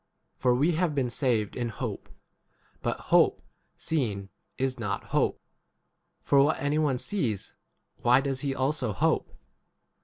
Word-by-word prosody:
For 125 -1 +2
we 145 +7 +3
have 165 -2 0
been 130 -4 0
saved 115 -5 0
in 120 -1 -2
hope; 110 - -5 0.7
but - - -2
hope - - +5 0.3
seen 105 -11 -1 0.3
is 130 -1 -1
not 105 -4 -2
hope; - - +2 0.8
for 140 -1 +5
what 145 +3 +2
any 145 +2 +1
one 145 -5 +2
sees, 125 - -2 0.4
25 - - -26
why 125 +2 +6
does 135 -2 -1
he 135 0 -2
also 130 -4 0
hope - - +1
130 Hz, 145 wpm, -28 LUFS, 120-145 Hz, 0.8 s, why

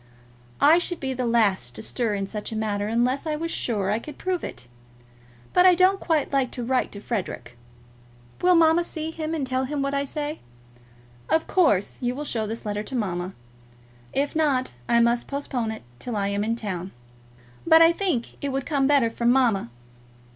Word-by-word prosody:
I 315 +4 +6
should 350 0 -3
be 265 -1 -2
the 250 -1 -2
last 200 - +2
to 110 - -6
stir 230 -5 -1
in 195 -1 -2
such 210 +2 -6
a - - -4
matter 210 -2 -1
unless 245 +6 0
I 305 - 0
was 330 +2 -3
sure 205 -5 -1
I 215 - +1
could 295 +4 -10
prove 370 -2 -2
it. 125 - -7 0.9
But 360 +1 +6
I 365 - +7
don't 375 +2 +4
quite 310 -4 0
like 270 -3 +2
to 245 - -4
write 255 +1 0
to 200 - -7
Frederic. 185 - -4 0.9
Will 360 0 +5
mamma 330 +1 +5
see 320 -1 -5
him, 320 0 -3
and 290 -4 -2
tell 260 0 -1
him 285 +1 -2
what 275 0 -1
I 280 0 0
say? 295 +2 -4 0.9
Of 320 - +2
course 210 - +2
you 245 0 -1
will 295 +2 -5
show 220 -6 -2
this 225 +1 -5
letter 210 0 -2
to 235 +5 -5
mamma. 185 -5 -2 0.8
If 280 +2 -1
not, 280 - +1 0.2
I 235 - +4
must 235 +1 +2
postpone 270 -5 -3
it 220 - -6 0.2
till 245 -3 -4
I 200 -1 0
am 200 0 -1
in 225 +2 0
town; 190 -5 -5 0.7
but 325 0 +8
I 330 - +7
think 340 -11 -2
it 285 - 0
would 270 -1 -2
come 280 -4 +1
better 275 -6 +3
from 235 +1 0
mamma. 240 - +2
255 Hz, 195 wpm, -25 LUFS, 215-305 Hz, 0.9 s, but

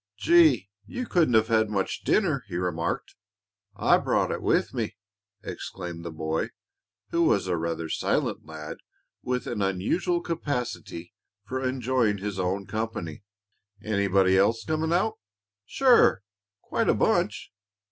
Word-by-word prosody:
"Gee! 135 - +5 0.2
You 250 - -4
couldn't 165 - +2
have 110 +1 +4
had 110 -1 +3
much 100 -3 -2
dinner," 155 -11 +2
he 90 - -6
remarked. 85 -2 -2 0.6
"I - - +4
brought - - +1
it - - -3
with - - +1
me," - - -3 0.5
exclaimed 85 -2 -6
the 85 - -5
boy, 80 0 -2 0.6
who 170 - +1
was 100 - +3
a 90 -1 0
rather 85 0 -2
silent - - -1
lad 80 -1 -8 0.4
with 125 0 -2
an 110 -4 -3
unusual 100 - 0
capacity 125 - -4 0.3
for 130 +2 -3
enjoying 130 -4 +1
his 100 0 -4
own 95 +2 -1
company. 110 -8 -4 0.6
"Anybody 100 -3 +2
else 115 +3 +2
coming 160 +1 -1
out?" 185 +6 +1 0.5
"Sure; 245 - +4 0.4
quite - - -1
a - - +4
bunch. - - +1
105 Hz, 135 wpm, -26 LUFS, 90-135 Hz, 0.6 s, Gee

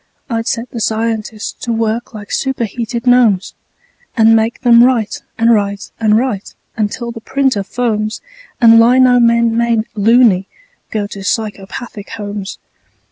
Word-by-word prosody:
I'd 225 0 -2
set 230 +1 -3
the 235 - -5
scientists 220 -1 -2
to 235 - -2
work 225 +1 -2
like 210 -3 -10
superheated 235 -2 -3
gnomes, 240 -6 +3 0.6
And 225 0 +5
make 225 +1 0
them 235 -2 +6
write 250 +2 +1 0.2
and 230 +1 +4
write 200 -2 -2
and 215 -1 +3
write 230 -5 -3 0.2
until 225 +2 -3
the 230 -1 -9
printer 265 -4 0
foams 215 0 -2 0.4
And 230 -1 +7
lino 250 +1 +5
men, 235 -1 +3
made 230 -1 +1
"loony", 215 -3 +3 0.4
go 210 -2 -2
to 200 -1 -8
psychopathic 210 +1 -4
homes. 205 -2 -6
225 Hz, 135 wpm, -15 LUFS, 210-235 Hz, 0.6 s, And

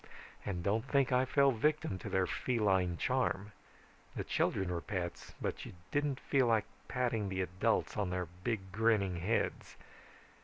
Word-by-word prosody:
"And 90 -4 -3
don't 105 +4 +1
think 135 -2 +2
I 125 +1 +4
fell 140 +1 +4
victim 130 -5 0
to - - -6
their 95 -1 +2
feline 95 -7 +1
charm. 125 -5 0 0.6
The - - -2
children 95 -2 0
were 85 -1 -2
pets, 85 -3 -4
but - - -3
you - - -8 0.2
didn't 145 -2 0
feel 135 -3 +2
like 110 -2 +3 0.2
patting 120 -5 0
the 95 0 0
adults 90 +1 0
on 100 -3 0
their 90 0 -1 0.2
big 100 -5 -2
grinning 105 -4 +2
heads. 100 +7 -1
105 Hz, 155 wpm, -34 LUFS, 95-125 Hz, 0.6 s, I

